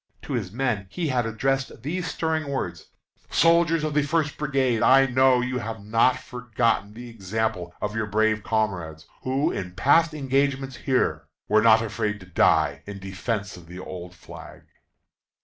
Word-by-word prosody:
To 145 - -5
his 105 -7 -2
men 115 -4 -1
he 165 - -3
had 125 -3 0
addressed 135 +2 -2
these 175 +5 -3
stirring 160 -2 -2
words: 85 - -4 0.4
"Soldiers 165 -1 +3
of 155 -1 -1
the 150 - +3
First 150 0 0
Brigade! 135 -6 0
I 135 +1 +6
know 130 -1 +4
you 125 0 -2
have 115 -1 -5
not 115 +4 +3
forgotten 115 -4 -1
the 120 +1 -9
example 110 -4 -3
of 105 0 -3
your 110 -1 -1
brave 110 +1 +1
comrades, 90 -8 -2 0.2
who, 130 +3 0
in 90 -1 -5
past 155 - +3
engagements 135 -1 0
here, 80 - 0 0.2
were 110 0 +4
not 110 0 +5
afraid 105 -1 -2
to - - -11
die 90 - +2
in 100 -1 -6
defence 100 +2 -4
of 85 -2 -14
the 90 +2 -10
old 90 -1 -8
flag." - - -12
115 Hz, 165 wpm, -25 LUFS, 100-135 Hz, 0.4 s, I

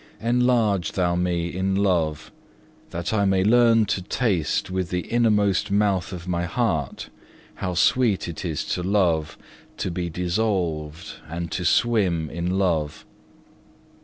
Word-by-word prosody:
6. - - -19
Enlarge 115 -7 +2
Thou 90 -2 +1
me 85 -1 -1
in 95 +1 0
love, 85 -6 0 0.6
that 85 +4 -4
I 105 -2 +2
may 95 -1 +2
learn 115 +1 +5
to 95 - -1
taste 95 - -1
with 95 -2 -2
the 90 0 -1
innermost 105 -2 +1
mouth 100 -4 +1
of 90 -1 -7
my 85 -1 -1
heart 85 - -2 0.4
how 90 -1 -4
sweet 110 +1 +2
it 85 - -6
is 80 -5 -3
to 90 - -2
love, 90 -5 +1 0.4
to 95 - -2
be 85 0 -3
dissolved, 85 -4 -2
and 85 0 -5
to 90 - -2
swim 95 -9 +2
in 85 +3 -2
love. 80 -5 -1
90 Hz, 140 wpm, -24 LUFS, 85-105 Hz, 0.6 s, learn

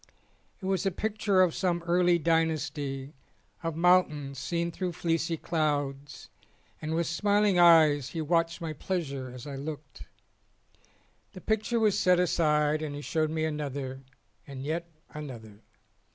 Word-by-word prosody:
It 195 - -8
was 190 0 0
a 195 - +2
picture 205 0 +1
of 175 -3 +1
some 175 -2 -1
early 175 0 +3
dynasty 150 -4 -1 0.5
of 165 -2 -3
moun 180 +2 +5
tains 140 -2 -7
seen 170 +5 -2
through 180 +1 -3
fleecy 165 0 -1
clouds, 145 -3 -2 0.5
and 155 +1 -2
with 170 +1 +1
smiling 205 +2 +2
eyes 155 -5 +6
he 165 - -5
watched 165 +1 +1
my 160 -2 -3
pleasure 140 -6 -3
as 125 -1 -10
I 140 -2 -6
looked. 145 0 -8 1.3
The 185 - -10
picture 220 +2 0
was 215 -3 +2
set 180 -1 +4
aside 155 -3 +2
and 150 -2 -4
he 145 - -6
showed 155 +1 0
me 160 0 -1
another 140 -3 -4 0.5
and 135 -2 -7
yet 170 +4 -3 0.2
another. 115 -8 -9
160 Hz, 145 wpm, -28 LUFS, 145-175 Hz, 1.3 s, eyes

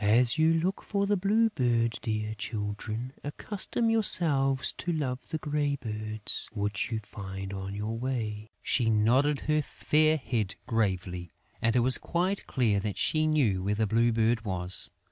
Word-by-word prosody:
"As 115 +5 +4
you 160 +1 +4
look 180 +4 -1
for 200 -1 -1
the 205 +1 +2
Blue 215 +4 +2
Bird, 115 - +1
dear 110 -2 -2
Children, 110 +3 -4
accustom 210 +9 -1
yourselves 145 -11 +3
to 175 - -2
love 130 -6 -3
the 160 - -2
grey 145 -1 -1
birds 110 -3 -3
which 105 +2 -2
you 110 - -1
find 95 -1 -7
on 95 0 -5
your 105 +2 -3
way." 110 -4 -3
She 120 -4 +2
nodded 125 +7 +3
her 155 0 +1
fair 155 +2 +2
head 110 -7 -2
gravely; 95 -6 -1 0.3
and 115 0 +2
it 125 - +4
was 130 +2 +3
quite 185 +3 -1
clear 110 -6 +2
that 105 0 -3
she 155 0 +2
knew 125 -12 +2
where 100 +2 0
the 110 +1 +1
Blue 115 +3 +2
Bird 115 0 +1
was. 90 -3 -1
115 Hz, 165 wpm, -29 LUFS, 105-150 Hz, 0.3 s, As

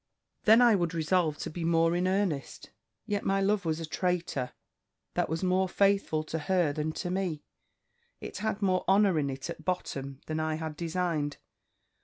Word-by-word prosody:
"Then 225 +3 +7
I 240 -2 +6
would 175 -3 0
resolve 160 -1 +1
to - - -5
be 170 +1 -5
more 165 0 +3
in 180 +1 +1
earnest. 185 -7 -1 0.3
Yet 205 -1 -1
my 195 0 +1
love 200 0 +1
was 160 0 0
a 165 - -4
traitor, 170 -6 -1 0.6
that - - 0
was 160 +3 -2
more 185 0 +2
faithful 195 -5 +2
to 160 +1 -4
her 170 -1 +1
than 155 +1 -2
to 175 - -3
me; 180 -5 -2 0.8
it - - -7
had 215 -1 -2
more 185 -2 +2
honour 195 -3 +4
in 140 -2 0
it 135 0 -5
at - - -7
bottom 140 -7 -3
than 155 0 -3
I 155 0 0
had 160 -1 -5
designed. 165 -3 -1
170 Hz, 180 wpm, -29 LUFS, 155-190 Hz, 0.8 s, Then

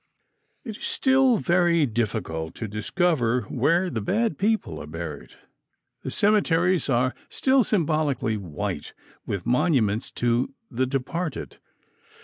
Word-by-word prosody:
It 220 -4 -7
is - - -12
still 265 -3 +3
very 175 -4 +3
difficult 100 -9 -3
to 115 - -5
discover 125 - 0
where 170 +9 +1
the 115 -11 -3
bad 220 - 0
people 220 +2 0
are - - -8
buried. - - -7 0.7
The - - -5
cemeteries 185 -5 +2
are 125 0 +2 0.2
still 265 -1 +3
symbolically 155 - 0
white 90 -8 -5 0.3
with 100 - -3
monuments 120 - +1
to 120 +3 0 0.2
the 130 +1 0
departed. 145 +6 -3
150 Hz, 120 wpm, -25 LUFS, 115-185 Hz, 0.7 s, still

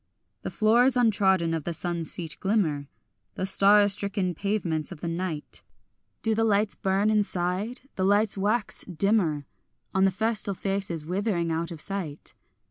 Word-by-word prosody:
The - - -4
floors 240 +4 +3
untrodden 190 -7 +2
of 160 -2 -2
the 170 +1 -3
sun's 170 -1 -2
feet 165 -4 -7
glimmer, 170 -9 0 0.5
The 185 - -2
star 200 +2 +6
unstricken 200 -2 -1
pavements 175 -5 -2
of 175 - -8
the 170 - -3
night; 165 -2 -4 0.6
Do 225 - +2
the 225 +1 +1
lights 210 -1 +2
burn 195 +3 +1
inside? 205 +2 0 0.2
the 190 - 0
lights 205 +2 +2
wax 210 +2 0
dimmer 175 -5 0 0.5
On 190 0 +4
festal 210 0 0
faces 195 -5 -2
withering 180 -1 -1
out 165 +1 -2
of 165 -3 -8
sight. 175 -5 -3
195 Hz, 145 wpm, -26 LUFS, 170-210 Hz, 0.6 s, star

